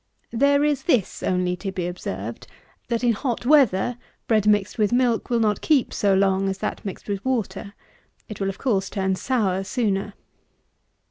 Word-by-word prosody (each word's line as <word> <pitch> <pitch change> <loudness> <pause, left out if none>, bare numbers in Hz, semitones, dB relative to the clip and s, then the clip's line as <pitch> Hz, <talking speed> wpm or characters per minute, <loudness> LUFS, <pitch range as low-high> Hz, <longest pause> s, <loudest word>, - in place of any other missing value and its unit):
There 280 +4 +3
is 295 -2 +1
this 245 - +1
only 180 -1 0
to 195 +1 -4
be 185 -2 -3
observed, 115 - -6 0.4
that 235 0 -1
in 240 -1 +4
hot 240 +1 -3
weather, 245 -5 +3 0.3
bread 215 -2 +2
mixed 210 0 +2
with 210 0 +2
milk 245 -2 +1
will 240 -1 +2
not 210 -3 +1
keep 290 -6 +2
so 200 -2 +2
long 195 0 +2
as 190 - -3
that 210 - -4
mixed 195 - -7
with 200 -1 -3
water. 210 -5 -3 0.5
It 215 - -8
will 195 - 0
of 195 - -6
course 205 -8 0
turn 190 -1 -1
sour 195 -3 0
sooner. 200 -2 -1
210 Hz, 175 wpm, -23 LUFS, 190-245 Hz, 0.5 s, in